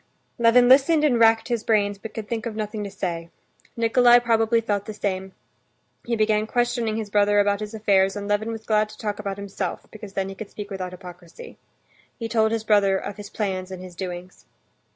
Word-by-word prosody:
Levin 235 +1 +5
listened 285 +5 +5
and 255 -6 +3
racked 225 0 +4
his 235 -2 -1
brains, 205 -3 +1
but 220 +1 -8
could 220 -2 -5
think 230 0 -3
of 220 - -6
nothing 215 0 -4
to 200 - -5
say. 170 -4 -4 0.5
Nikolay 240 +1 +5
probably 230 -1 +2
felt 205 -3 -2
the 215 - -6
same; 190 -2 -3 0.8
he 235 - 0
began 215 -1 +1
questioning 240 -2 0
his 215 -2 -5
brother 205 0 +3
about 200 0 +2
his 215 +1 -6
affairs; 195 -3 +2
and 200 -1 -5
Levin 205 +2 0
was 220 -1 -7
glad 215 -1 +2
to 215 - -13
talk 210 -1 -4
about 200 -1 -4
himself, 200 -2 -5
because 210 -2 -10
then 195 -1 -2
he - - -6
could 200 +2 -9
speak 205 -1 -8
without 185 -2 -4
hypocrisy. 180 -2 -12 0.6
He 230 - -4
told 220 -1 +2
his 225 -1 -1
brother 205 -3 +3
of 200 +2 -6
his 205 -1 -9
plans 190 -4 -3
and 185 -1 -8
his 185 -1 -10
doings. 180 0 -7
210 Hz, 205 wpm, -23 LUFS, 195-225 Hz, 0.8 s, Levin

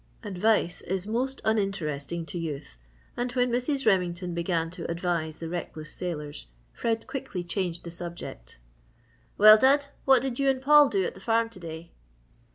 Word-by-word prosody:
Advice 200 -2 +1
is 190 0 -1
most 255 +5 -2
uninteresting 170 -7 -1
to 175 +1 -5
youth 150 - -5 0.4
and 245 0 -2
when 250 -1 +1
Mrs. 265 +3 0
Remington 180 -1 +1
began 170 -1 -1
to 175 -1 -6
advise 170 -2 -2
the 165 - -6
reckless 160 -2 -6
sailors, 150 - -5 0.3
Fred 225 -1 -1
quickly 195 -9 -5
changed 175 -1 -2
the 170 - -7
subject. 170 - -8 0.8
"Well, 215 +1 +9
Dud 280 +3 +4 0.2
what 265 -2 +5
did 265 -2 -3
you 275 0 +3
and 265 -1 +1
Paul 295 +1 +6
do 195 -2 +1
at - - -2
the - - -13
farm 230 +1 +1
to 225 - -11
day?" 165 -1 -8
185 Hz, 165 wpm, -27 LUFS, 170-235 Hz, 0.8 s, Well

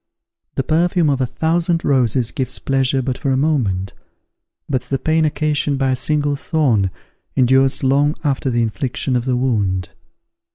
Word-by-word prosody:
The 135 - 0
perfume 165 +2 +2
of 135 -1 -1
a 130 - +1
thousand 165 +4 0
roses 125 -3 +1
gives 130 - -3
pleasure 135 -1 0
but 125 -1 -3
for 140 - -2
a 130 - +2
moment; 115 -11 0 0.7
but 130 -3 0
the 135 +2 -3
pain 160 +4 +1
occasioned 150 -2 0
by 135 -1 +1
a - - +1
single 145 +2 0
thorn 130 - +1 0.5
endures 130 +1 +3
long 140 +3 +2
after 140 -2 0
the 120 -1 +1
infliction 125 +3 -2
of 120 0 0
the 125 -2 0
wound. 100 -8 0
135 Hz, 160 wpm, -19 LUFS, 125-150 Hz, 0.7 s, endures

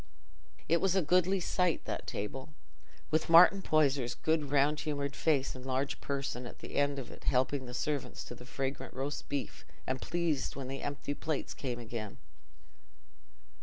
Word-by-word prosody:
It 170 +1 +3
was 195 -1 +2
a 190 - +3
goodly 185 +4 +3
sight—that 180 -1 0
table, 135 +9 -5 0.6
with 155 +1 +1
Martin 180 +4 +8
Poyser's 140 -7 +2
round 155 -3 +2
good 145 +1 +3
humoured 140 -2 -2
face 145 -4 +1
and 130 - -9
large 130 +1 -1
person 135 -3 -3
at - - -10
the - - -9
head 145 0 +2
of 130 -3 -6
it - - -13
helping 130 0 +1
his 125 0 -4
servants 145 -1 -2
to - - -8
the 120 - -11
fragrant 135 +1 -4
roast 135 +3 -4
beef 140 -1 -3 0.2
and 130 0 -2
pleased 170 -4 -1
when 135 -1 -5
the 135 - -4
empty 145 0 -3
plates 155 0 -3
came 125 -3 -4
again. 115 -3 -6
140 Hz, 165 wpm, -32 LUFS, 130-155 Hz, 0.6 s, Martin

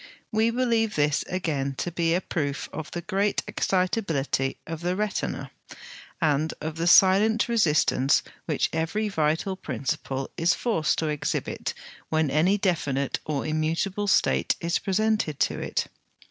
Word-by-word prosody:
We 220 +1 +3
believe 230 -3 +1
this 145 -1 +2
again 145 -7 -2
to 175 - -3
be 165 0 +1
a 180 - 0
proof 145 -6 -3
of 160 0 -5
the 175 - -5
great 200 +2 0
excitability 170 -8 0
of 165 0 -6
the 180 +1 0
retina, 210 0 -2 0.7
and 155 -2 +1
of 155 +1 -5
the 165 +1 0
silent 200 +5 +5
resistance 150 - +3 0.2
which - - 0
every 210 +7 -1
vital 160 +2 0
principle 135 -3 -3
is 170 +1 +3
forced 165 -11 0
to 160 - 0
exhibit 150 -1 -2 0.3
when 155 -3 +1
any 170 +8 +3
definite 145 -9 0
or 145 -3 -1
immutable 165 +6 -1
state 195 - +2
is 170 0 0
presented 210 -6 0
to - - +1
it. - - -1
165 Hz, 140 wpm, -26 LUFS, 150-200 Hz, 0.7 s, silent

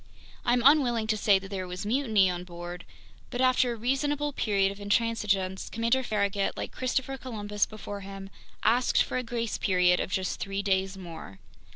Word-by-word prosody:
I'm 240 0 +2
unwilling 255 -6 +5
to 220 0 +1
say 205 -1 +4
that 195 0 -8
there 190 -2 -4
was 180 +2 -5
mutiny 220 -4 +3
on 180 -1 -2
board, 175 0 -8 0.4
but 245 - -5
after 255 -1 +3
a - - -3
reasonable 285 +5 0
period 200 -5 +1
of 200 - -10
intransigence, 205 -3 0
Commander 230 +3 +1
Farragut, 200 -4 -1
like - - -4
Christopher 265 +1 -2
Columbus 210 -5 -2
before 205 -1 -7
him, 195 0 -9 0.3
asked 245 +2 +3
for - - -3
a - - 0
grace 230 -1 -3
period 180 -2 +3
of - - -2
just 185 -1 -1
three 195 0 -3
days 190 -1 0
more. 165 - -9
205 Hz, 175 wpm, -28 LUFS, 190-240 Hz, 0.4 s, unwilling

